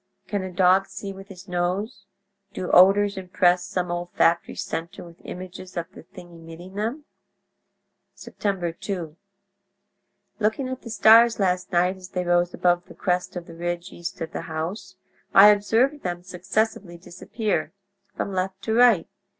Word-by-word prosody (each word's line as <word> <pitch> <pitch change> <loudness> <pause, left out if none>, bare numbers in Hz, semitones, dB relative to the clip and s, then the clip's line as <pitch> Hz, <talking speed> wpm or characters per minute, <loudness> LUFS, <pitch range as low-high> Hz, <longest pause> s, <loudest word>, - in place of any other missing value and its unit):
"Can 205 -2 -2
a 185 0 -6
dog 185 +2 +3
see 195 -1 -7
with 195 0 -12
his 195 -1 -13
nose? 180 +5 -3 0.5
Do 180 - -4
odors 200 +2 +5
impress 180 -1 +2
some 180 -1 -2
olfactory 175 -1 0
centre 165 +2 -5
with 170 -1 -15
images 185 0 -9
of 170 -1 -4
the - - -12
thing 175 +1 -14
emitting 165 +2 -12
them?... 230 +9 -3 1.1
"Sept - - -13
2.—Looking 195 - -5
at 260 0 -5
the 230 - -10
stars 230 +1 +6
last 185 -2 0
night 180 +1 +2
as 185 0 -12
they 180 -2 -2
rose 175 0 +2
above 175 0 +1
the - - -13
crest 180 0 -1
of 175 -1 -5
the 165 - -12
ridge 175 +2 -4
east 170 - -7
of 165 - -4
the - - -4
house, 165 +5 -5 0.4
I 200 +2 +10
observed 225 +8 +2
them 175 -1 -4
successively 185 0 -2
disappear—from 200 +1 -5
left 190 +1 -2
to 220 - -1
right. 230 -7 +5
185 Hz, 150 wpm, -24 LUFS, 175-200 Hz, 1.1 s, I